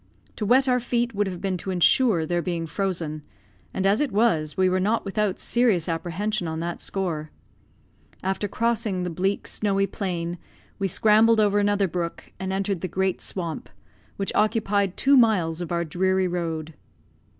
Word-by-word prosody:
To 210 - -2
wet 260 +4 +4
our 250 -1 +3
feet 240 0 -1
would 205 0 0
have 180 -2 -6
been 190 -2 -1
to 190 - -6
ensure 185 0 +3
their 175 +2 0
being 170 -2 -3
frozen; 165 -3 -3 0.5
and 190 - -2
as 200 +5 +3
it 290 -5 0
was, 195 -8 +1
we 185 0 +4
were 185 0 +1
not 210 +4 0
without 200 -1 -1
serious 225 -9 +2
apprehension 175 +4 -2
on 160 0 -3
that 170 +1 -4
score. 165 -6 -3 0.9
After 190 +2 -1
crossing 225 -3 -1
the 180 - -3
bleak, 190 +4 -1
snowy 195 -2 0
plain, 175 -4 -4 0.4
we 195 - +1
scrambled 220 +4 +4
over 205 -1 +3
another 205 -1 +2
brook, 170 -1 -5
and 190 0 -3
entered 195 -2 -1
the 185 - -2
great 190 +1 -1
swamp, 170 -4 -5 0.5
which 195 - -2
occupied 205 -3 +1
two 280 +1 +4
miles 185 -9 +3
of 175 - -5
our 170 0 0
dreary 185 +3 +1
road. 165 -3 -3
190 Hz, 170 wpm, -24 LUFS, 175-210 Hz, 0.9 s, wet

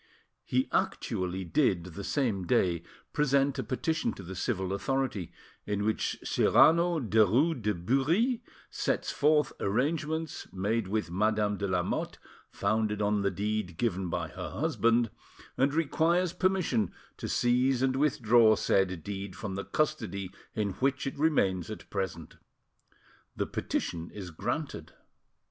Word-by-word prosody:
He 130 +1 0
actually 95 +1 -1
did, 95 - +2
the 100 - -6
same 105 - -1
day, 85 -2 +2 0.3
present 140 -2 +2
a - - 0
petition 155 +8 -1
to 100 - -10
the 90 +2 -7
civil 95 -2 -1
authority, 125 -4 -1 0.4
in 105 0 -1
which 110 - 0
Cyrano 170 +1 +4
Derues 120 - +3
de 105 0 0
Bury 155 - +1 0.3
sets - - -1
forth 150 -1 +3
arrangements, 150 +8 -1
made 105 +3 -1
with 100 -4 -2
Madame 105 +2 +1
de 100 - -2
Lamotte, 90 -2 -1 0.3
founded 105 +1 0
on 105 0 +1
the 100 - +2
deed 105 -4 -2
given 95 -5 -1
by - - -2
her - - -6
husband, 115 0 +1 0.4
and 135 +2 +2
requires 165 +3 +1
permission 185 - +1 0.3
to - - -5
seize 125 +1 +2
and 130 -1 +2
withdraw 120 -6 +4
said 95 -5 +1
deed 100 -2 -5
from 105 -3 -5
the 100 +1 -4
custody 105 - -1 0.2
in 105 -2 0
which 135 +1 +1
it 135 - -3
remains 95 - +2
at 110 - -8
present. 95 -5 -4 1.0
The - - -1
petition 85 0 -3
is 95 -4 -8
granted. 80 - -4
110 Hz, 135 wpm, -30 LUFS, 95-140 Hz, 1.0 s, Cyrano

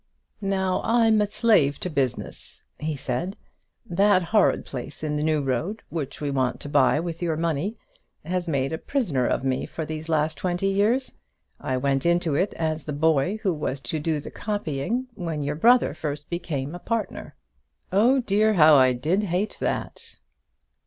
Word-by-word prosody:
"Now 190 -2 0
I'm 225 -2 +4
a 210 - +2
slave 200 - +3
to - - -2
business," 130 -5 -2 0.2
he 155 0 -2
said. 140 +8 -3 0.5
"That 195 -1 +3
horrid 210 +4 +2
place 135 +4 -7
in 150 -1 -1
the 150 - -1
New 155 -1 +1
Road, 145 - -2
which 150 -5 -4
we 145 -1 -2
want 130 -2 0
to 145 - -6
buy 145 0 +4
with 165 0 -5
your 165 -3 0
money, 165 +5 -1 0.5
has 180 +1 -2
made 135 -2 0
a 160 - -3
prisoner 160 - 0
of - - 0
me 130 -1 -1
for 160 - -5
the 155 0 -5
last 155 -1 0
twenty 180 +1 0
years. 215 +7 +1 0.5
I 130 - -2
went 135 +1 0
into 170 -2 +2
it 185 +8 0
as 160 -1 -2
the 150 - -4
boy 160 +5 +2
who 190 -4 +2
was 150 -3 -3
to 155 - -3
do 155 0 -1
the - - -8
copying, 205 - -2
when 165 -7 -4
your 145 +1 -1
brother 240 +10 +4
first 150 0 -5
became 160 -5 -3
a 175 - -6
partner. 225 +1 -3 0.6
Oh 240 +8 +4
dear, 215 0 +2
how 155 -3 +7
I 130 -3 +6
did 160 +11 0
hate 185 +3 -2
it!" - - -3
160 Hz, 175 wpm, -25 LUFS, 145-195 Hz, 0.6 s, how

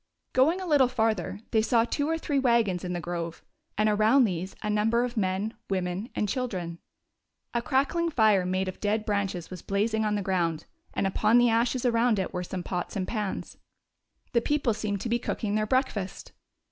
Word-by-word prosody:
Going 305 +8 +4
a 375 - -4
little 290 -6 +4
farther, 220 -4 -1
they 220 - +4
saw 230 0 +3
two 285 +5 -1
or 325 - +1
three 290 -3 0
wagons 235 -8 +2
in 180 -1 -3
the 175 - -2
grove, 170 -1 -5 0.3
and 215 - +3
around 215 +6 +4
these 185 -3 -2
a - - -2
number 225 +3 +2
of 245 0 -3
men, 200 +1 -1 0.2
wo 195 -1 +1
men 180 +5 -4
and 210 - 0
children. 190 -8 -3 0.7
A 235 - +1
crackling 285 +7 +1
fire 215 - +4
made 185 +1 -1
of 185 - -5
dead 210 +1 0
branches 195 -4 -2
was 180 -3 -7
blazing 220 +2 0
on 210 -1 +1
the 205 - -1
ground, 170 -4 0 0.3
and - - 0
upon 210 +4 +3
the 240 -1 +5
ashes 240 +2 +1
around 235 -1 +3
it 190 - -2
were 180 - -2
some 180 0 -5
pots 175 -1 -4
and 190 -2 -2
pans. 210 -4 -4 0.8
The 235 - +4
people 285 -3 +1
seemed 205 -2 -3
to 235 - -3
be 235 +1 +1
cooking 215 -3 -2
their 215 0 +1
breakfast. 240 -6 -1
215 Hz, 195 wpm, -27 LUFS, 190-240 Hz, 0.8 s, the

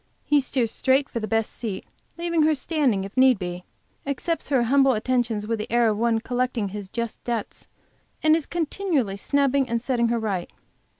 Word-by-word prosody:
He 295 - +3
steers 255 -4 0
straight 270 +3 +2
for 235 - -4
the 215 - -4
best 225 0 0
seat, 210 -5 -5 0.3
leaving 335 -1 0
her 310 0 +4
standing, 275 - 0
if 195 - -8
need 260 -2 +5
be, 180 -1 -5 0.4
accepts 285 +5 -2
her 265 -4 +3
humble 270 +2 +4
attentions 235 -2 0
with 225 0 -2
the 215 - -5
air 235 -1 +4
of 215 - 0
one 230 -1 +2
collecting 245 -3 -1
his 200 -1 -7
just 235 +1 -4
debt 235 -3 -4 0.6
and 310 0 +6
is 320 -3 -2
continually 320 - -1
snubbing 275 +4 +1
and 235 0 0
setting 240 -1 0
her 235 0 +1
right. 200 -6 -2
240 Hz, 185 wpm, -24 LUFS, 220-280 Hz, 0.6 s, and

